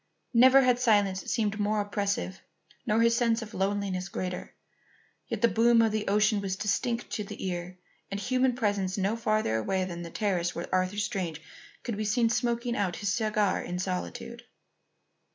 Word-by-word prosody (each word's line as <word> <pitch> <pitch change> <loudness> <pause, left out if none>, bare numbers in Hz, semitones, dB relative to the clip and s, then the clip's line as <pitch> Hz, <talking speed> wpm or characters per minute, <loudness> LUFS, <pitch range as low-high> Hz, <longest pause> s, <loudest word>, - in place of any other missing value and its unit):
Never 260 +3 +7
had 250 -1 +3
silence 205 -5 +2
seemed 215 -2 0
more 210 +1 +1
oppressive 200 -2 -2 0.5
nor 220 +1 +3
his 230 0 +4
sense 235 -1 +1
of 215 - -11
loneliness 195 -1 -1
greater. 180 -1 -5 0.7
Yet - - -4
the - - +8
boom 230 +1 +4
of 225 - +2
the 215 0 -2
ocean 210 +1 +3
was 190 -1 -2
distinct 230 +4 -1
to 210 - -2
the 200 - -7
ear, 180 0 -4 0.3
and 200 - -3
human 255 +4 +1
presence 205 -5 -1
no 200 +3 +1
farther 215 - 0
away 185 - 0
than 175 -2 -6
the 170 - -6
terrace 180 -4 -1
where 170 - -3
Arthur 185 +2 +1
Strange 180 -6 -2 0.4
could 230 -4 -3
be 215 - -2
seen 230 +2 +2
smoking 240 0 0
out 195 -5 -1
his 205 -1 -1
cigar 215 -3 +1
in 175 +1 -4
solitude. 185 +5 -4
205 Hz, 170 wpm, -28 LUFS, 190-230 Hz, 0.7 s, the